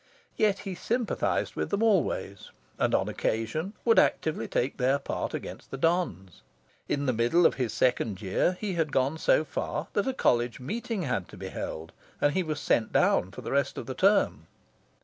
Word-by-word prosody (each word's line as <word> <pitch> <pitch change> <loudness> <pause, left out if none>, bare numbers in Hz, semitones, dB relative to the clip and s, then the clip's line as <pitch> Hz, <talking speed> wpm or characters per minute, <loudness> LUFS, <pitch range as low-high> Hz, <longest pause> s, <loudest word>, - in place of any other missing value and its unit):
Yet 210 -2 +2
he 195 - -3
sympathised 235 +6 -1
with - - -2
them 200 +2 0
always, 170 - 0 0.3
and, - - +2
on - - +1
occasion, 115 - -2
would 230 -1 +6
actively 155 -8 +1
take 130 - -1
their 135 +2 +2
part 140 - -4
against - - -7
the 135 - -5
dons. 135 - -1 0.5
In 145 0 0
the 130 - +2
middle 120 +10 +3
of - - +5
his 125 -5 -2
second 115 -4 +1
year, 110 - 0
he 205 -3 -2
had 160 -4 0
gone 135 +4 +1
so 155 - +3
far 150 +3 -3
that 205 - 0
a 265 - +1
College 120 - +1
Meeting 210 - -3
had 110 - -2
to - - -13
be - - -6
held, 80 +1 -6 0.3
and 145 - +2
he 190 - +1
was 155 -4 -3
sent 115 -5 +1
down 90 - +3
for - - -9
the - - -5
rest 140 -1 +1
of 130 - -5
term. 200 +2 +2
145 Hz, 190 wpm, -28 LUFS, 120-185 Hz, 0.5 s, would